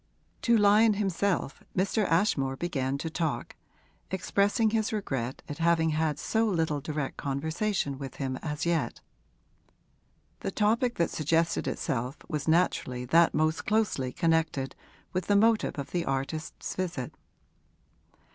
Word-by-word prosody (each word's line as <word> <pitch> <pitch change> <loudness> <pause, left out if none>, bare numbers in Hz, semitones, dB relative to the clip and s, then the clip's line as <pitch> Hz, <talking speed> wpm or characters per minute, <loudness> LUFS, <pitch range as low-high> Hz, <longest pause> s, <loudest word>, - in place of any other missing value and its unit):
To 235 -1 +4
Lyon 210 +1 +5
himself 195 -5 -1 0.2
Mr. 200 +3 +2
Ashmore 155 -7 +2
began 135 -4 -1
to 160 +3 -4
talk, 160 -2 -2 0.5
expressing 200 +4 +1
his 220 -1 +1
regret 135 - -3
at 145 0 -6
having 165 -1 +3
had 155 -1 0
so 225 +8 +1
little 160 -7 0
direct 150 -1 -3
conversation 150 +1 -1
with 135 -2 -6
him 135 -2 -3
as 150 +1 -4
yet. 170 -1 0 1.4
The - - -3
topic 230 +3 +1
that 170 - +1
suggested 165 +2 +1
itself 125 +1 -2
was 150 -1 -3
naturally 160 -7 +1
that 165 +6 +4
most 155 +1 +1
closely 205 -12 +1
connected 160 -4 0 0.4
with 185 -1 -2
the 205 - +3
motive 220 -2 +3
of 140 - -5
the 175 -1 0
artist's 135 +4 -3
visit. 175 -9 -3
165 Hz, 130 wpm, -29 LUFS, 140-200 Hz, 1.4 s, Lyon